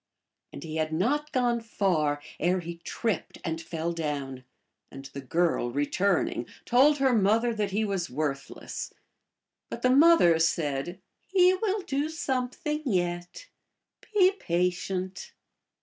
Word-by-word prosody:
And 140 - -9
he 160 -1 -5
had 155 0 -1
not 280 - 0
gone 245 -3 +1
far 160 -10 0 0.2
ere 180 +3 +2
he 170 0 -7
tripped 195 +1 -3
and 165 0 -2
fell 165 +1 -3
down, 140 -5 -4 0.5
and 135 0 -10
the 140 0 -8
girl, 165 -2 0
returning, 145 0 0 0.2
told 280 +5 +5
her 270 -2 +3
mother 225 +3 +3
that 210 -2 -1
he 210 +3 0
was 195 -4 -2
worthless. 140 0 -4 0.8
But - - -7
the 255 - +4
mother 275 - +6
said, 160 +1 0 0.2
" - - -46
He 365 0 +6
will 400 +1 -1
do 285 +1 -1
something 300 0 -2
yet. 175 - -2 0.6
Be 380 -3 +5
patient." 180 +2 -2
185 Hz, 135 wpm, -27 LUFS, 160-255 Hz, 0.8 s, mother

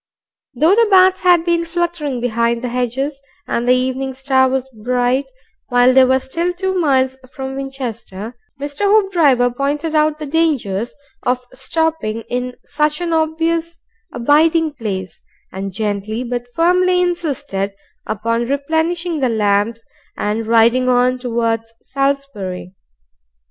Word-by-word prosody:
Though 315 +9 +4
the 460 +2 +4
bats 375 -1 +5
had 350 -2 +4
been 340 -1 +2
fluttering 335 -6 -2
behind 235 0 0
thehedges 250 +3 -2 0.3
and 240 +1 -1
the 250 - +6
evening 260 +1 -2
star 265 0 +2
was 265 0 -1 0.2
bright 250 +2 +1 0.4
while 245 0 +4
they 265 0 +7
were 260 +1 +3
still 335 +7 -2
two 380 +1 -2
miles 265 -7 +1
from 265 0 -6
Winchester, 240 -6 -6 0.2
Mr. 285 +7 -3
Hoopdriver 335 - +3
pointed 290 +5 -2
out 305 0 +2
the 305 - -6
dangers 275 -9 0 0.3
of 250 0 -1
stopping 265 -4 -1
in 250 0 -2
such 300 +1 0
an 345 -1 -2
obvious 325 +1 0 0.3
abiding 315 +5 +3
place, 190 - -5 0.3
and 195 +1 -5
gently 210 +3 -3
but 245 0 -4
firmly 360 +2 +3
insisted 285 - -2 0.3
upon 230 +3 -1
replenishing 320 +4 -1
the 260 -3 +1
lamps 215 +1 +1 0.3
and 215 +2 -2
riding 235 +3 +4
on 250 0 +3
towards 230 -2 -1
Salisbury. 275 -10 -3
265 Hz, 130 wpm, -18 LUFS, 235-320 Hz, 0.4 s, they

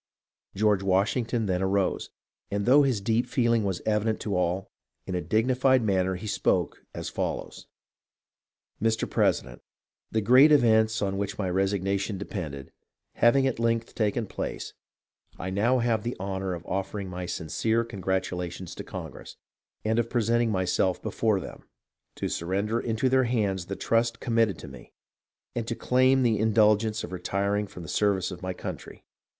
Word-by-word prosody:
George 105 -1 +2
Washington 110 +5 +1
then 90 -2 0
arose, 95 0 0 0.4
and 100 0 -1
though 135 +4 +6
his 130 -7 +1
deep 115 +4 +1
feeling 120 -4 +2
was 95 -3 -2
evident 110 0 +1
to 100 -3 -2
all, 90 +1 -1 0.3
in 95 - -5
a 90 - -1
dignified 125 - +2
manner 95 -3 +1
he 90 - -7
spoke 105 - 0
as - - -6
follows: - - -4 0.4
— - - -67
" - - -45
Mr. 110 0 +1
President: - - 0 0.5
The 110 - 0
great 130 +8 +7
events 110 -5 +4
on 95 0 -1
which 100 -1 -3
my 100 - -1
resigna 95 +1 0
tion 100 +1 -3
depended, 80 -9 -6 0.4
having 130 +3 +4
at 130 -3 -1
length 115 0 0
taken 110 +1 0
place, - - -5 0.6
I 95 +2 -4
now 115 +7 +2
have 115 -3 +1
the 120 +2 -4
honour 95 -1 -3
of 85 0 -10
offering 95 +1 -3
my 90 0 -5
sincere 110 +9 0
congratulations 95 -4 -3
to - - -7
Congress, - - -8 0.5
and 110 +1 +2
of 115 0 0
presenting 120 0 +2
myself 95 -1 +1
before 110 -1 0
them, - - -10 0.5
to - - -3
surrender 100 +6 -1
into 115 +2 0
their 130 0 +3
hands 100 -7 -1
the 100 - -4
trust 115 +2 0
committed 115 -4 +1
to - - -10
me, 65 -3 -13 0.6
and 115 -2 -2
to 115 - -2
claim 130 +2 +3
the 115 -4 +2
indulgence 110 0 +3
of - - -7
retiring 100 +3 -1
from 90 -2 -10
the - - -9
service 95 +2 +1
of 90 - -8
my 95 0 -3
country. - - -8
105 Hz, 165 wpm, -27 LUFS, 95-115 Hz, 0.6 s, great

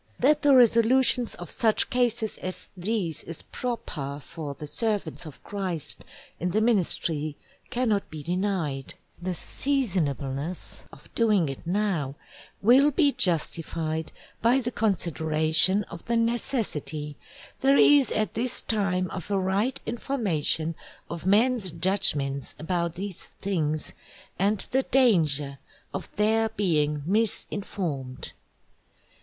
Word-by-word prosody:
That 300 +4 +3
the 285 -2 +5
Resolutions 245 +1 +4
of 175 -2 -5
such 220 -2 +2
Cases 240 -3 0
as 185 0 -6
these 185 -3 -2
is 165 - -8
proper 165 - -5
for 150 -4 -7
the 150 - -8
Servants 200 -2 -2
of 150 - -12
Christ 180 -7 -2 0.4
in 180 - -1
the 200 +5 +1
Ministry 165 -9 0 0.3
cannot 235 -5 0
be 155 -2 -8
denied; 175 -6 -2 0.3
the 180 0 -2
seasonableness 170 - -2
of - - -16
doing 210 -9 +2
it 135 +4 -8
now, 175 -8 -1 0.5
will 260 +7 +6
be 290 0 +3
justified 160 - -1 0.3
by 240 +4 +4
the 245 -1 -3
Consideration 160 -2 +3
of 170 -3 -10
the 235 0 0
necessity 225 - 0 0.4
there 275 +1 +4
is 285 -2 +6
at 215 0 -1
this 245 +3 0
time 195 -4 0
of 185 0 -6
a 200 - +1
right 200 +8 0
Information 190 - 0 0.4
of 170 +1 -5
men's 220 0 +4
Judgments 155 -6 +1
about 170 +1 -2
these 195 0 -7
things, 155 -6 -2 0.5
and 205 +3 +2
the 265 - +3
danger 155 - +2 0.3
of - - -5
their 220 +2 +2
being 150 -8 0
misinformed. 185 - -2
190 Hz, 120 wpm, -26 LUFS, 160-230 Hz, 0.5 s, will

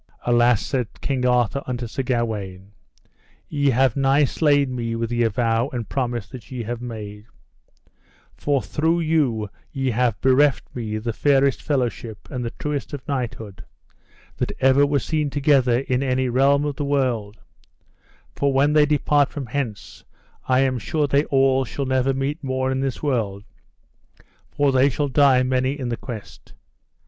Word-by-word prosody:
Alas, 120 -2 +3
said 125 -4 -1
King 130 -2 0
Arthur 125 +2 +1
unto 125 -1 -3
Sir 120 +4 -4
Gawaine, 105 -7 -3 0.8
ye 145 -2 +1
have 130 -1 +2
nigh 140 +1 +3
slain 145 -3 +1
me 115 -1 -3
with 115 0 -3
the 120 0 0
avow 115 +2 +1
and 120 -5 -5
promise 120 -5 -2
that 130 -5 -11
ye 125 -3 -5
have 120 +2 -5
made; 105 -3 -7 1.1
for 140 -3 0
through 165 +3 0
you 145 -10 +1 0.2
ye 135 -2 -1
have 115 -2 0
bereft 135 +1 +3
me 110 -3 -3
the 115 +1 -3
fairest 140 +1 +2
fellowship 120 -6 -3
and 125 -1 -3
the 115 - -2
truest 145 +3 -4
of 140 - -7
knighthood 115 -8 -4 0.7
that - - -1
ever 135 +2 +4
were 145 0 +1
seen 150 +2 -1
together 135 -4 +2
in 130 -1 -1
any 130 -1 0
realm 140 +3 +3
of 145 -2 -3
the 145 - -2
world; 125 -7 -1 1.0
for 140 0 +1
when 140 +2 +3
they 150 -1 +5
depart 145 -1 +2
from 140 -3 -6
hence 120 -4 -5 0.4
I 130 0 +3
am 130 -2 +1
sure 150 +7 -1
they 140 +1 +2
all 135 -1 +3
shall 135 +2 -4
never 130 0 +1
meet 135 +4 -3
more 130 0 -1
in 130 - -1
this 135 0 -3
world, 110 -8 -1 1.1
for 145 -1 +1
they 130 +1 +4
shall 145 +1 -1
die 135 -2 +4
many 130 +2 0
in 125 -2 -3
the 120 - -1
quest. 115 -3 -10
130 Hz, 160 wpm, -22 LUFS, 120-140 Hz, 1.1 s, they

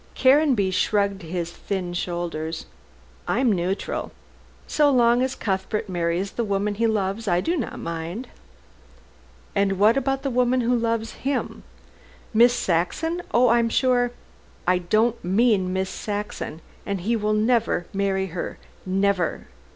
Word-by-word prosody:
Caranby 260 -7 +4
shrugged 200 +1 +1
his 170 0 -4
thin 185 -3 -4
shoulders. 170 -2 -3 0.6
"I - - +1
am 255 -3 +3
neutral. 185 +1 -2 0.5
So 295 -1 +3
long 240 -2 +4
as 260 +1 0
Cuthbert 205 +2 -2
marries 175 +2 -1
the 235 - -2
woman 205 0 0
he 230 +3 +1
loves, 210 0 -1
I 175 -2 +3
do 335 - 0
not 270 -9 -3
mind." 170 +8 -5 1.3
"And 200 -1 +1
what 215 +6 +5
about 270 0 0
the 275 - -1
woman 250 +1 +2
who 245 +1 +2
loves 230 -1 -1
him?" 275 0 -2 0.7
"Miss 235 +2 +6
Saxon? 245 - 0
Oh, 245 +1 +4
I 235 +1 +5
am 230 0 +1
sure 245 0 +2 0.3
" - - -29
"I - - 0
don't 215 +6 +1
mean 195 -1 +2
Miss 190 0 -1
Saxon, 205 -6 -5 0.2
and 200 -2 -3
he 230 +6 +1
will 215 -1 0
never 220 -4 +1
marry 195 -1 0
her 180 - -4 0.3
never. 190 -2 0
210 Hz, 145 wpm, -24 LUFS, 185-240 Hz, 1.3 s, Miss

